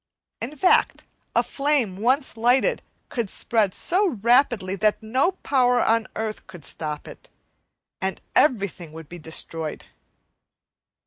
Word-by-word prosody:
In 250 +7 -5
fact, 365 +6 +3 0.3
a - - +4
flame 275 -9 0
once 260 +6 +1
lighted 250 - +2 0.3
would 235 -5 -1
spread 215 -4 0
so 390 +4 +2 0.2
rapidly 240 -6 +3
that 215 +1 +1
no 260 - +1
power 250 -3 +3
on 225 -1 +2
earth 220 -1 -4
could 175 -6 -12
stop 150 0 -4
it, - - -13 0.7
and 190 0 -2 0.2
everything 195 - +1
would 160 -1 -10
be 175 - -9
destroyed. 160 0 -4
225 Hz, 125 wpm, -24 LUFS, 185-265 Hz, 0.7 s, a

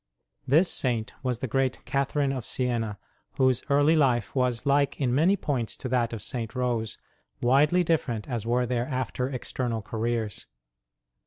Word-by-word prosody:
This 160 +7 +4
Saint 120 -4 0
was 125 -3 -1
the 130 - -3
great 130 +1 -1
Catherine 140 +1 0
of 130 -3 -3
Siena, 115 -4 -1 0.4
whose 130 -2 +2
early 145 +2 +4
life 130 -8 +2
was 125 -3 0
like 140 0 +2
in 125 -4 +1
many 170 +9 +4
points 125 - -2
to - - -5
that 120 -2 +1
of 110 -4 -5
St. 115 -1 -4
Rose, 120 -4 -1 0.4
widely 145 +8 +4
different 135 -10 -1
as 120 -5 -3
were 120 +2 +1
their 120 0 -1
after 130 -1 -2
external 120 -3 -3
careers. 115 -2 -3
125 Hz, 155 wpm, -27 LUFS, 120-140 Hz, 0.4 s, This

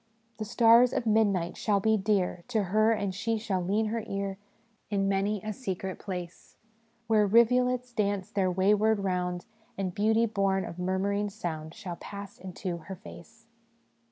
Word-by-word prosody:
" 225 0 -41
' 230 -1 -39
The 215 - -3
stars 235 +2 +5
of - - -1
midnight 205 -5 +2
shall 205 -2 +1
be 220 +2 +3
dear 190 -4 0
To 225 -4 0
her; 215 +4 +3
and 200 -3 -1
she 225 +3 -1
shall 210 -4 -2
lean 205 +5 +1
her 225 0 -2
ear 195 -1 -3 0.5
In 200 -2 0
many 195 +1 0
a 215 0 -3
secret 190 -5 -4
place 180 -3 -7 0.5
Where 215 -2 +3
rivulets 250 +3 +3
dance 200 -4 -1
their 195 -2 +1
wayward 205 +3 +3
round, 180 -2 -2 0.3
And 190 -2 -2
beauty 220 +3 +3
born 195 -3 0
of 170 - -8
murmuring 200 +3 0
sound 165 -6 -5
Shall 175 -2 -6
pass 200 -1 -9
into 185 -1 -5
her 170 +4 -8
face.' 225 +3 -14
200 Hz, 165 wpm, -29 LUFS, 190-220 Hz, 0.5 s, stars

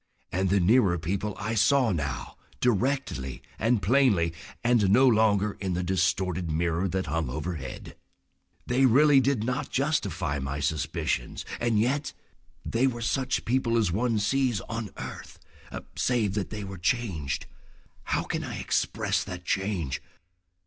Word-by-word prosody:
And 95 +1 0
the 100 +1 +3
nearer 95 -1 +4
people 95 +5 -2
I 105 +2 -2
saw 125 +2 +4
now 70 -5 -3 0.2
directly 120 - 0 0.2
and 115 -2 +2
plainly, 100 -7 +3 0.3
and 120 -5 +3
no 130 +7 +6
longer 105 -3 +3
in 95 -3 -2
the 90 - -1
distorted 90 -1 0
mirror 85 +3 0
that 95 0 -2
hung 75 -1 -1
overhead. 75 -1 -5 0.7
They 130 +2 +3
really 140 +3 +6
did 135 -4 +1
not 125 +4 -2
justify 100 - -1
my 70 +1 -3
suspicions, 70 -4 -2
and 120 -3 +2
yet—! 140 +6 0 0.5
They 120 +3 +2
were 120 -3 -3
such 130 +2 0
people 120 -1 +1
as 105 -7 +2
one 115 +4 +1
sees 120 +1 +1
on 115 -2 -5
earth—save 115 -6 -4
that 100 -1 -2
they 105 -1 -5
were 95 -2 -7
changed. 90 - -1 0.6
How - - 0
can - - -3
I - - -5
express - - 0
that 90 -1 -8
change? 95 -8 -1
100 Hz, 140 wpm, -27 LUFS, 85-120 Hz, 0.7 s, no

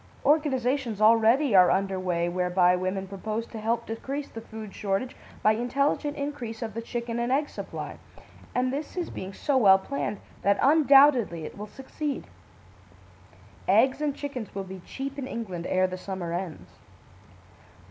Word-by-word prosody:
Organisations 265 -6 +1
already 230 +4 +5
are 180 -1 +8
under 190 0 +1
way 175 -2 0
whereby 180 0 +3
women 185 +1 -2
propose 215 +4 -4
to 225 - -8
help 230 +2 -1
decrease 275 +6 -4
the 225 - -8
food 220 -2 -9
shortage 205 +5 -2 0.3
by 215 - +6
intelligent 275 +6 0
increase 260 -6 -4
of 220 -2 -5
the 230 - -4
chicken 235 0 -4
and 240 +1 -1
egg 290 +2 +1
supply, - - -7 0.6
and 255 +1 +1
this 295 +5 -5
is 350 - -2
being 190 +1 -6
so 270 +7 0
well 195 -6 +7
planned 205 -1 -4 0.2
that 200 0 +3
undoubtedly 275 - +5
it - - -8
will 210 +1 -7
succeed. 275 +4 -5 1.4
Eggs 265 +2 +4
and 295 -2 0
chickens 260 -9 -6
will 195 - -2
be 190 0 -8
cheap 275 +1 -5
in 260 - -4
England 185 -9 -5
ere 185 0 +3
the 185 0 -3
summer 180 -3 -5
ends. 155 - -6
225 Hz, 155 wpm, -27 LUFS, 190-270 Hz, 1.4 s, are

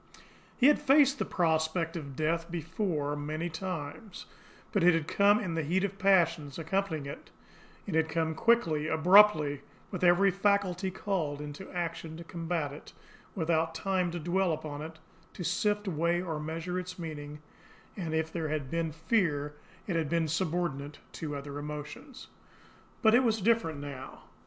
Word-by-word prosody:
He 255 - +3
had 295 +1 +6
faced 280 -1 +5
the 215 - 0
prospect 165 -1 0
of 140 -5 -6
death 165 +3 -1
before 160 -3 -2
many 155 +3 -3
times, 180 +3 -6 0.5
but 200 -5 +1
it 175 -1 +6
had 160 -2 -1
come 200 +3 +4
with 195 -7 -3
the 165 - 0
heat 175 +6 0
of 200 0 -3
passion 170 -6 +3
accompanying 165 -2 -1
it, 140 - -8 0.6
it - - -5
had 160 0 +2
come 160 0 0
quickly, 160 -6 +2
abruptly, 160 -3 +5 0.3
with 185 -3 -4
every 180 +3 +5
faculty 195 -1 +1
called 180 -6 -2
into 150 +5 -8
action 165 -2 -4
to 170 - -8
combat 165 -3 -3
it, 145 - -12 0.4
without 165 -2 0
time 180 +1 0
to 175 +1 -4
dwell 175 +2 +1
upon 150 -2 -5
it, 160 +1 -8 0.4
to 180 - -5
sift, 205 +4 0
weigh, 170 0 +1
or 165 -4 -3
measure 165 +4 -3
its 185 0 -7
meaning, 150 -3 -6 0.6
and 165 -5 -3
if 160 0 -1
there 165 -2 -2
had 150 -4 -3
been 165 -1 -1
fear 160 -3 0 0.3
it 185 - -2
had 160 -3 0
been 165 0 +1
subordinate 160 -4 -2
to 150 -2 -5
other 140 0 -6
emotions. 150 - -8 0.8
But 220 -1 +6
it 245 - +6
was 225 -2 +2
different 200 -7 +2
now. 140 -2 -8
165 Hz, 160 wpm, -30 LUFS, 155-190 Hz, 0.8 s, had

